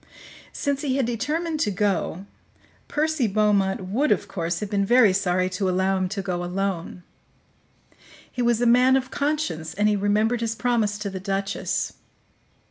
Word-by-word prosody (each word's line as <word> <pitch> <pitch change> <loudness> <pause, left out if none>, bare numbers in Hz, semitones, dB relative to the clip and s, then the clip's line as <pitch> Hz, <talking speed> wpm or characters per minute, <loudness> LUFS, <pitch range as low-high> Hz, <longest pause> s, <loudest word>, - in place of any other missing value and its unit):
Since 285 -1 -2
he 270 -3 -1
had 270 - +1
determined 310 +8 -2
to 215 - +1
go, 195 -2 -1 0.6
Percy 305 -4 0
Beaumont 200 -2 +2
would, 270 +10 +1
of - - +1
course, 170 -1 -3
have 210 -2 -5
been 200 -1 +1
very 225 -1 +5
sorry 185 -1 +1
to 185 +1 -1
allow 190 +1 +1
him 185 -1 -1
to 195 0 -4
go 180 -2 -2
alone; 180 -1 -3 1.3
he 250 - -3
was 235 -1 +2
a - - +3
man 250 +2 +5
of 260 -1 -1
conscience, 280 - -2
and 205 +1 +2
he 210 - +3
remembered 210 +4 +1
his 225 -1 -1
promise 225 -4 0
to 205 -1 -4
the 190 - -5
duchess. 195 +1 -2
210 Hz, 165 wpm, -24 LUFS, 190-245 Hz, 1.3 s, very